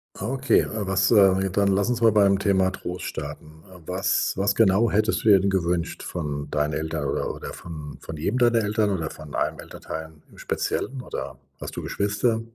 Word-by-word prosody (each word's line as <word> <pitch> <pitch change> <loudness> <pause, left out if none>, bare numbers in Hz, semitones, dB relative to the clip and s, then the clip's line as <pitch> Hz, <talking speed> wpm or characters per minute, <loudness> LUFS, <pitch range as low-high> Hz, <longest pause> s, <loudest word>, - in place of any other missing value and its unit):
Okay. 130 +4 +2
Äh, 105 -3 -4
was 95 +2 +2
äh, 100 -4 +7
ne, 95 -1 -1
dann 100 0 +2
lass 100 +4 +2
uns 120 -1 -1
mal 115 -1 +6
beim 100 -2 +4
Thema 95 -1 +2
Trost 90 -1 -6
starten. 75 +1 -7
Äh, 90 -1 -13
was 95 +1 0
was 100 +1 +1
genau 110 +1 +4
hättest 110 +2 +1
du 110 - +4
dir 100 -2 +8
denn 100 +1 +1
gewünscht 85 -2 -1
von 75 -4 -4
deinen 75 +1 0
Eltern 80 -2 -2
oder - - -1
oder - - -8
vom 75 -4 -8
von 80 - -7
jedem 120 +11 -1
deiner 120 -1 +4
Eltern 105 0 +1
oder 85 -5 -2
von 75 -2 -9
einem - - -1
Elternteil 80 0 -7 0.2
im - - -18
Speziellen? 130 -1 -2
Oder - - -6 0.2
hast - - -6
du - - -5
Geschwister? 105 +3 0
95 Hz, 200 wpm, -24 LUFS, 80-105 Hz, 0.2 s, dir